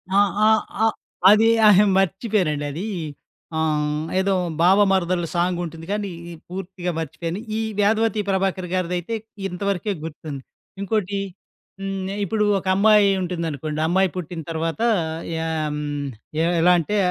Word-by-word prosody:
ఆ! - - +5 0.3
ఆహ్, 220 0 +5 0.2
ఆహ్, 225 - +3 0.4
అది 215 +2 +6 0.2
అహే 210 0 +7
మర్చిపోయానండి 190 -6 0
అది. 165 +8 -5 0.7
ఆహ్, 150 -1 0 0.2
ఏదో 195 +1 +1 0.3
బావ 185 +3 +6
మరదల్ల 180 -2 +1
సాంగుంటుంది 175 -2 -1
కానీ, 205 -2 -2 0.4
పూర్తిగా 180 -1 -4
మర్చిపోయాను. 165 +3 -4 0.2
ఈ - - 0 0.2
'వేదవతి 215 +1 +2
ప్రభాకర్' 190 -1 0
గారిదయితే 180 +3 -1 0.3
ఇంతవరకే 200 +2 -2
గుర్తుంది. 155 -3 -7 0.4
ఇంకోటి 200 -1 -1 0.6
హ్మ్, 195 -1 -3 0.2
ఇప్పుడు 210 +2 0
ఒక 190 - -6
అమ్మాయి 210 0 +5
ఉంటుందనుకోండి. 160 -4 -3
అమ్మాయి 190 +3 +3
పుట్టిన 175 -2 -5
తర్వాత 165 +5 -2 0.6
యా 160 0 -2 0.3
హ్మ్, 145 -1 -3 0.4
ఎ - - +3 0.2
ఎలా 180 +2 +6
అంటే, 170 +6 -2
180 Hz, 125 wpm, -22 LUFS, 165-200 Hz, 0.7 s, అహే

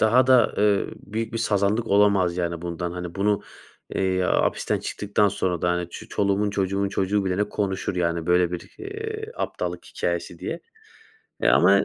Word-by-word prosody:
daha 120 +4 +5
da, 125 -4 +5
eee, 105 -1 +3
büyük 110 +3 -5
bir 115 - -2
sazanlık 105 +1 +1
olamaz, 100 -4 +3
yani, 85 -1 -2
bundan. 85 0 -3
Hani, 90 -1 -6
bunu, 100 +1 +1 0.5
eee, 95 -1 +1
hapisten - - +1
çıktıktan 105 0 +1
sonra 90 -3 -1
da, 90 - +3
hani, 90 0 -2
ç 110 - -8
çoluğumun 100 +1 +1
çocuğumun 100 0 0
çocuğu 100 +1 0
bilene 95 +2 +1
konuşur, 95 -3 -2
yani, 85 -1 0
böyle 90 0 +3
bir, 90 - -6
eee, 435 +2 -6
aptallık - - -3
hikâyesi - - -3
diye. - - -4 0.8
Eee, - - +4
ama - - +5
100 Hz, 160 wpm, -24 LUFS, 90-105 Hz, 0.8 s, daha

